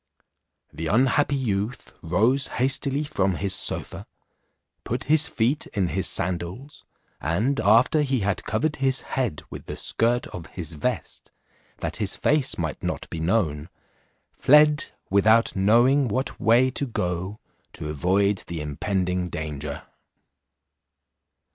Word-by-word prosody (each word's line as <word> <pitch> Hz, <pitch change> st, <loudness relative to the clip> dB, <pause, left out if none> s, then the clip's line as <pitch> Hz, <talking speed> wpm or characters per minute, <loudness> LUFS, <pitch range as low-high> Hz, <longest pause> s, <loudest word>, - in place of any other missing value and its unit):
The 80 Hz, -, -4 dB
unhappy 135 Hz, -, +2 dB
youth 115 Hz, -2 st, -3 dB
rose 110 Hz, +12 st, +2 dB
hastily 135 Hz, +2 st, +2 dB
from 100 Hz, -11 st, 0 dB
his 100 Hz, +1 st, -1 dB
sofa, -, -, 0 dB, 0.8 s
put -, -, -3 dB
his 155 Hz, +2 st, +4 dB
feet 120 Hz, +6 st, 0 dB
in 95 Hz, -4 st, +1 dB
his 95 Hz, +1 st, -1 dB
sandals, 90 Hz, +11 st, -4 dB, 0.4 s
and 105 Hz, -, 0 dB
after 115 Hz, +8 st, +4 dB
he 135 Hz, -4 st, 0 dB
had 100 Hz, -2 st, -1 dB
covered 155 Hz, -1 st, -1 dB
his 135 Hz, -1 st, +2 dB
head 120 Hz, -, -3 dB
with -, -, -9 dB
the -, -, -6 dB
skirt 120 Hz, +2 st, 0 dB
of 85 Hz, -, -9 dB
his 85 Hz, -2 st, -7 dB
vest, 75 Hz, -, -4 dB, 0.5 s
that -, -, -3 dB
his -, -, 0 dB
face 145 Hz, -3 st, +1 dB
might 80 Hz, -4 st, -4 dB
not -, -, -4 dB
be 85 Hz, -, -4 dB
known, 80 Hz, -4 st, 0 dB, 0.6 s
fled, 150 Hz, +1 st, +4 dB, 0.2 s
without 110 Hz, +4 st, +4 dB
knowing 120 Hz, +8 st, +4 dB
what 130 Hz, +5 st, -2 dB
way 120 Hz, +3 st, +4 dB
to 140 Hz, +2 st, -2 dB
go, 90 Hz, -1 st, -3 dB, 0.3 s
to -, -, -6 dB
avoid 95 Hz, +6 st, +1 dB
the 85 Hz, -1 st, -5 dB
impending 90 Hz, +4 st, -2 dB
danger. 75 Hz, -3 st, -5 dB
105 Hz, 130 wpm, -24 LUFS, 90-130 Hz, 0.8 s, his